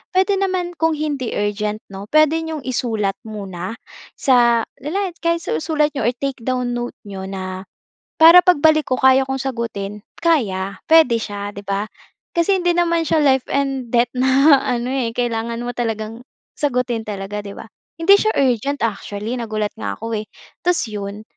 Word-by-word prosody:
puwede 380 +1 +3
naman 370 -2 -1
kung 325 0 +2
hindi 290 -5 -3
urgent 210 +1 -2
'no, 195 +1 -8
puwede 310 +4 +4
niyong 320 -3 -5
isulat 225 -6 -1
muna, 195 -1 -6 0.4
sa, 240 -3 +4 0.2
le 280 - -8
la 385 +3 -1
kahit 335 0 0
sa - - -4
isulat 305 -2 +1
niyo 270 -7 -1
or 240 - 0
take 275 +1 -4
down 250 +1 -1
notes 240 0 -4
niyo, 195 -2 -7
na 185 0 -6 0.5
para 335 +3 +9
pagbalik 310 -3 +4
ko 255 - -1
kaya 265 0 +5
kong 265 0 -3
sagutin 220 -6 -4 0.2
kaya, 200 - +1
puwede 315 -8 +5
siya 205 -2 -5
'di 200 - -8
ba. 200 +2 -2 0.5
Kasi 370 +3 +2
hindi 350 -1 +1
naman 335 -2 +1
siya 310 0 +2
life 265 -2 +3
and 270 -2 -1
death 240 0 +3
na 265 +3 +5
ano, 245 -1 -2
eh, 245 -4 -2
kailangan 235 -1 -2
mo 245 - -3
talagang 225 -2 -3 0.3
sagutin 250 -5 -1
talaga, 200 0 -4
'di 200 -1 -8
ba. - - -8 0.3
Hindi 390 +5 +5
siya 435 - +1
urgent 275 +1 +1
actually 220 +1 -3
nagulat 215 -2 -2
nga 100 -2 -3
ako, 225 -1 -4
eh. 215 - -8 0.3
Tas 355 -1 +1
'yon, 205 0 -6
245 Hz, 170 wpm, -20 LUFS, 210-305 Hz, 0.5 s, para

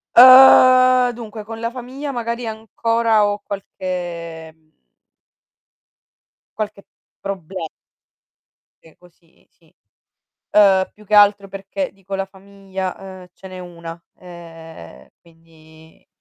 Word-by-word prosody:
Uhm, 255 -1 +7
dunque, 220 -2 -9
con 225 +1 -9
la 230 - -2
famiglia 260 +3 -7
magari 235 -1 -4
ancora 225 0 0
ho 205 0 -2
qualche 175 -5 -7
mhmm 160 -1 -36 1.9
qualche 210 -2 -5 0.4
proble 185 -3 -6 1.2
Sì, 160 - -20
così, 175 -1 -26
si. - - -31 0.8
Uhm, 195 -2 +4
più 210 - -19
che 210 - -2
altro 205 -1 +4
perché, 195 +9 -6
dico 195 0 -10
la 195 0 -3
famiglia, 190 -1 -8
uhm, 190 -1 -12
ce 190 - -14
n'è 185 - -10
1, 170 -2 -10 0.2
ehm, 165 - -13
quindi 160 -1 -22
195 Hz, 105 wpm, -19 LUFS, 170-225 Hz, 1.9 s, Uhm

